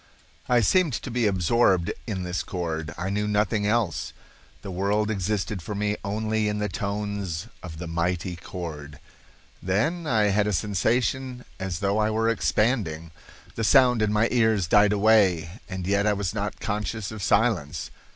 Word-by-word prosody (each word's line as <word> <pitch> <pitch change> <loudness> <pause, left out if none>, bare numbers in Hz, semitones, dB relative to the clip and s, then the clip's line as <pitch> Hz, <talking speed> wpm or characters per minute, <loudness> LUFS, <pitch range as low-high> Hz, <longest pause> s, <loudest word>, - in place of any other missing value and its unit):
I 120 -1 +4
seemed 165 - +3
to 125 - -4
be 120 -2 +1
absorbed 95 -1 +2
in 95 -5 -3
this 90 0 -2
chord. 80 -3 -4
I 95 +2 -3
knew 105 +1 -1
nothing 105 0 +1
else. 110 -6 0 0.5
The 100 - -6
world 100 +4 0
existed 100 0 -2
for 105 +5 -5
me 105 +1 0
only 110 +1 -1
in 105 0 -1
the 105 0 -1
tones 100 -3 -3 0.2
of 80 -4 -8
the 85 - -6
mighty 85 +2 -2
chord. 80 -4 -7 0.6
Then 135 - 0
I 110 -5 +3
had 105 +1 +2
a 105 - 0
sensation 125 +6 0
as 95 -2 -4
though 100 +1 +1
I 105 0 +2
were 110 +1 +1
expanding. 105 -8 0 0.4
The 115 - -3
sound 125 -1 +5
in 105 -1 +2
my 105 +2 +3
ears 110 -6 +3
died 105 +4 +5
away, 100 -4 +3
and 95 -1 -4
yet 100 +2 +2
I 105 - +4
was 100 -2 -2
not 105 -1 -3
conscious 105 0 -3
of 110 -2 -7
silence. 100 -6 +1
105 Hz, 165 wpm, -25 LUFS, 90-110 Hz, 0.6 s, sound